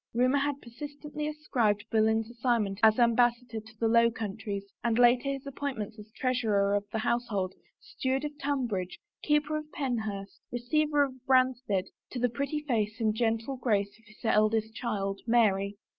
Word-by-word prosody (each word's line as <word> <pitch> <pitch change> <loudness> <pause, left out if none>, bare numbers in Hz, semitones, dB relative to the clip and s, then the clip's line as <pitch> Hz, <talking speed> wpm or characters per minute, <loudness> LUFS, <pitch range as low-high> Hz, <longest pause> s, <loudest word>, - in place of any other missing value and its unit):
Rumor 255 +4 +3
had 285 0 -2
persistently 295 +4 -6
ascribed 235 -9 0
Boleyn's 220 0 +2
assignment 230 -5 0
as 220 -1 +6
Ambassador 240 -1 +2
to 220 0 -16
the 230 - +1
Lx)w 230 0 +4
Countries 205 -1 -4 0.2
and 230 -1 +1
later 245 +2 +5
his 275 0 -4
appoint 280 -1 -4
ments 215 +1 -5
as 210 +1 -11
treasurer 220 -6 +1
of 205 0 0
the - - -1
household, 215 -5 -1 0.3
steward 265 +2 -2
of 295 0 -5
Tun 280 -2 0
bridge, 185 -5 -3 0.2
keeper 300 0 +1
of 305 0 -7
Penhurst, 220 -7 -3
receiver 290 +5 +2
of 275 -2 -2
Branstead, 255 -7 +2 0.2
to - - -6
the 245 +1 +2
pretty 280 +5 -2
face 215 -3 0
and 220 -2 +2
gentle 225 +3 -1
grace 205 -5 0
of 225 - -26
his 215 +2 -15
eldest 220 0 +2
child, 200 -5 -2
Mary. 205 -4 +3
235 Hz, 165 wpm, -29 LUFS, 215-260 Hz, 0.3 s, as